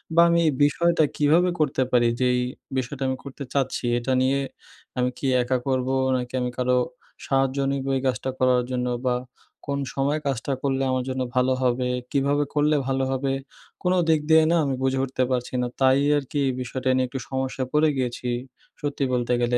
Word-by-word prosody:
বা 170 - +7
আমি 170 0 +3
এই 155 - +4
বিষয়টা 165 +3 +3
কীভাবে 160 +5 +4
করতে 140 -3 +1
পারি। 120 -1 +4
যে 130 - +2
এই 125 - +1 0.4
বিষয়টা 130 +1 -3
আমি 130 0 -1
করতে 140 0 -8
চাচ্ছি 135 -2 -1
এটা 120 +2 -2
নিয়ে 135 +1 +2 0.6
আমি 125 0 +2
কি - - -6 0.2
একা 130 +1 0
করবো? 130 0 0 0.2
নাকি 125 -1 -3
আমি 125 - -1
কারও 125 0 +2 0.5
সাহায্য 135 0 +1
নিবো 135 0 -2
এই 130 - -3
কাজটা 130 +1 -1
করার 125 -1 +4
জন্য? 125 -1 -1 0.2
বা 125 - +2 0.6
কোন 140 - -1 0.2
সময়ে 140 +3 +1
কাজটা 135 0 -2
করলে 135 -1 0
আমার 130 -1 0
জন্য 130 0 -2
ভালো 130 +1 +3
হবে? 125 0 +1 0.2
কীভাবে 140 +1 +2
করলে 150 +1 +3
ভালো 135 0 0
হবে? 135 +1 -1 0.5
কোন 180 0 +2 0.2
দিক 160 -1 +4
দিয়ে 160 0 +7
না - - +4
আমি 140 -2 0
বুঝে 130 0 +1
উঠতে 130 -1 -1
পারছি 125 -1 -2
না। 125 - 0
তাই 130 +1 +5 0.2
আর 145 - -1
কি 145 - 0 0.2
বিষয়টা 130 +1 -3
নিয়ে 130 0 +2
একটু 130 +2 -5
সমস্যা 130 0 -2
পড়ে 150 +1 +4
গিয়েছি 125 -1 -2 0.5
সত্যি 145 -1 -2
বলতে 125 0 +1
গেলে। 120 0 +2
130 Hz, 190 wpm, -24 LUFS, 125-140 Hz, 0.6 s, বা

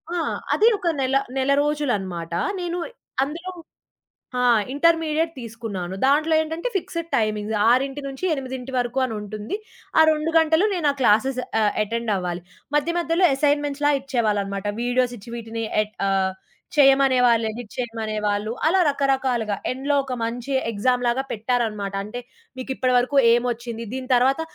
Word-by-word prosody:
ఆ! - - 0 0.4
అది 440 - +4
ఒక 365 -3 -4
నెల 265 0 +1 0.2
నెల 265 +1 +1
రోజులనమాట. 200 - -2 0.3
నేను 350 -1 -3 0.5
అందులో 335 +6 -5 0.9
ఆ! - - +2 0.3
ఇంటర్మీడియేట్ 325 +1 +2
తీసుకున్నాను. 220 -6 -6
దాంట్లో 305 +4 +3
ఏంటంటే 320 +6 -3
ఫిక్స్‌డ్ 335 -2 -5
టైమింగ్స్ 215 -1 -1
6-8 270 0 -1
వరుకు 245 +1 0
అని 240 - -4
ఉంటుంది. 210 - -5 0.4
ఆ - - +9
2 310 +1 -1
గంటలు 320 +4 +4
నేనా 320 -6 +2
క్లాసెస్ 250 +2 +3 0.2
ఆహ్, 210 -1 +3
అటెండ్ 230 +1 -2
అవ్వాలి. 180 -1 -3 0.3
మధ్య 295 +3 +1
మధ్యలో 340 +2 +2
అసైన్‌మెంట్స్‌‌లా 290 0 +1
ఇచ్చేవాళ్ళనమాట. 210 -7 -1 0.2
వీడియోస్ 245 0 +1
ఇచ్చి 220 +3 -12
వీటిని 225 -1 -5 0.2
ఎట్ 215 0 -6
ఆహ్, 190 -1 +1 0.4
చేయమనేవాళ్ళు 260 -5 +5
ఎడిట్ 225 -1 -9
చేయమనేవాళ్ళు 215 -3 -2 0.2
అలా 375 +4 +3
రకరకాలుగా. 265 -6 0 0.2
ఎండ్‌లో 270 +3 -1
ఒక 265 -1 -5
మంచి 240 +4 -4 0.2
ఎగ్జామ్ 245 +4 +1
లాగా 245 +3 +1
పెట్టారనమాట. 220 -3 -1
అంటే 215 +4 -6 0.4
మీకిప్పటి 255 0 -1
వరకు 255 +3 +1 0.2
ఏమొచ్చింది? 235 -1 -2
దీని 260 0 -5
తర్వాత 265 +5 +3
250 Hz, 130 wpm, -23 LUFS, 220-290 Hz, 0.9 s, ఆ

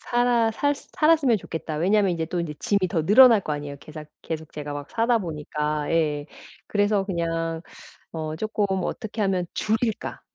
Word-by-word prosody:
살아 240 -2 +2
살 285 +6 +1
살았으면 305 -6 +2
좋겠다. 160 -4 -5
왜냐하면 195 +3 +3
인제 165 -1 -2
또 175 +1 -2
인제 155 -3 -4
짐이 200 -3 +1
더 165 -5 -1
늘어날 230 +2 +7
거 150 - -3
아니에요 145 -1 -5
계삭 155 0 -10 0.2
계속 160 -1 -5
제가 145 -1 -6
막 145 0 -7
사다보니까. 155 -10 -1
예 150 -3 +1 0.4
그래서 205 -1 +2
그냥 165 -3 -2 0.5
어 155 -1 -4
쪼금 215 +2 -1 0.2
'어떻게 220 -1 -4
하면 190 -2 +1
줄일까?' 220 0 -1
175 Hz, 340 characters per minute, -24 LUFS, 155-220 Hz, 0.5 s, 늘어날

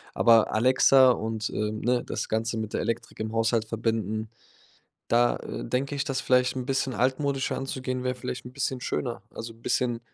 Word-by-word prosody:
Aber 115 -2 +5
Alexa 130 +2 +6
und, 110 -2 -2
äh, 105 0 -1
ne, 120 +3 0
das - - -3
Ganze 115 +1 -1
mit 110 -1 -4
der - - 0
Elektrik 115 - -4
im 110 +1 -3
Haushalt 115 0 +1
verbinden, 110 -1 -2 0.8
da, 120 +1 +3
äh, - - -6
denke 135 - -1
ich, 140 - -1
dass 135 -1 -2
vielleicht 125 0 +3
'n 130 - -2
bisschen 135 -2 0
altmodischer 135 +3 0
anzugehen 130 -1 -3
wäre 125 0 0
vielleicht 125 0 -5
'n 125 - -9
bisschen 130 -1 -2
schöner. 125 -1 -3
Also, 115 0 -7
'n 115 - -23
bisschen, 120 -2 0
120 Hz, 185 wpm, -27 LUFS, 115-130 Hz, 0.8 s, Alexa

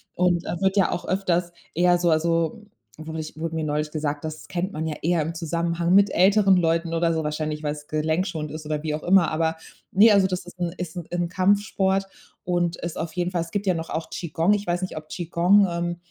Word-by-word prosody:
und 175 -1 +2
wird 190 +3 -1
ja 190 - +3
auch 175 - -3
öfters 180 -2 0 0.2
eher 175 +1 +4
so 175 -1 +1
also, 165 +5 +1 0.3
wurde 160 0 -6
ich 155 0 -7
wurde 165 0 -3
mir 160 - -1
neulich 150 0 -1
gesagt, 150 -1 -3
das 155 0 -6
kennt 185 +2 -3
man 155 +1 -4
ja 150 - -3
eher 170 0 +1
im 165 +2 -4
Zusammenhang 170 +1 -1
mit 200 0 +5
älteren 195 +1 +5
Leuten 165 0 +1
oder 165 0 +2
so 160 -1 -1
wahrscheinlich, 150 0 -3
weil's 150 0 -4
gelenkschonend 155 0 -1
ist 155 0 -7
oder 150 0 -2
wie 155 -1 -2
auch 155 - -6
immer. 180 -3 +4
Aber 160 +1 0 0.4
ne, 215 +3 +6
also 195 -2 +5
das 180 -1 -4
ist 180 0 -13
'n 175 -1 -1
ist 180 0 -5
'n 170 - -5
'n 175 -1 -1
Kampfsport 195 0 +1 0.4
und 175 -1 0
ist 170 -1 -5
auf 160 -1 -4
jeden 180 0 -1
Fall 175 -2 0
es 165 - -6
gibt 205 0 -2
ja 185 - +4
noch 165 0 -5
auch 160 - -4
Qi 170 - -5
Gong. 165 +6 +2
Ich 205 -2 -2
weiß 175 +1 0
nicht, 185 - -4
ob 155 0 -8
Qi 175 - -5
Gong, 190 +4 +4
ähm 175 0 -2
170 Hz, 235 wpm, -24 LUFS, 160-180 Hz, 0.4 s, ne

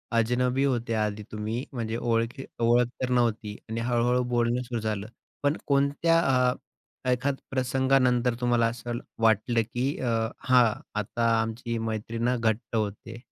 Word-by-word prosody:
अजनबी 125 +3 +2
होत्या 115 -5 0
आधी 105 0 -4
तुम्ही, 110 +3 -3
म्हणजे 115 -2 -3
ओळखी 115 +3 -1 0.2
ओळख 120 +1 +4
तर 130 - 0
नव्हती 115 -3 +1
आणि 115 +1 -2
हळू-हळू 120 +1 +2
बोलणं 120 +1 +2
सुरू 120 -2 -3
झालं, 105 -2 -2 0.4
पण 145 +2 +2
कोणत्या 140 +4 +3 0.3
अ, - - -2 0.6
एखाद 135 +3 +1 0.2
प्रसंगानंतर 130 -1 +2
तुम्हाला 120 -1 +3
असं 120 +1 -4
ल 120 - -3 0.2
वाटलं 115 +2 +3
की 130 +4 -1
अ, 125 - -1 0.3
हां 125 -1 +5 0.3
आता 115 +3 0
आमची 115 +1 -3
मैत्री 110 0 -3
ना 120 +2 +1
घट्ट 115 0 -1
होतेय? 110 +1 -3
120 Hz, 145 wpm, -27 LUFS, 115-125 Hz, 0.6 s, हां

